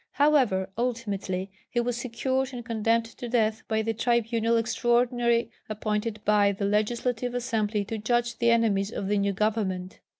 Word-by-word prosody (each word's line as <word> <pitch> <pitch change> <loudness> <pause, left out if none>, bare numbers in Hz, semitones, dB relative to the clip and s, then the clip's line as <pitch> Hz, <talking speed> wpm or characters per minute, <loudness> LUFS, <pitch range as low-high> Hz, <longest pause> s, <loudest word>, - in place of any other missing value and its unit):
However, 265 -11 +3
ultimately 200 -6 -2 0.2
he 240 - 0
was 240 0 0
secured 260 +2 -2
and 240 -2 -6
condemned 230 0 +1
to 230 +1 -8
death 220 -2 +1
by 220 0 0
the 225 +1 -1
tribunal 230 0 +1
extraordinary 240 +1 +1 0.2
appointed 215 0 -2
by 205 -1 +4
the 200 +1 -3
Legislative 235 +4 0
Assembly 215 -4 -1
to 220 +2 -4
judge 240 +1 0
the 235 -1 +3
enemies 215 -4 +2
of 195 - -4
the 205 0 +1
new 200 0 +1
government. 195 -3 -1
225 Hz, 155 wpm, -27 LUFS, 210-240 Hz, 0.2 s, by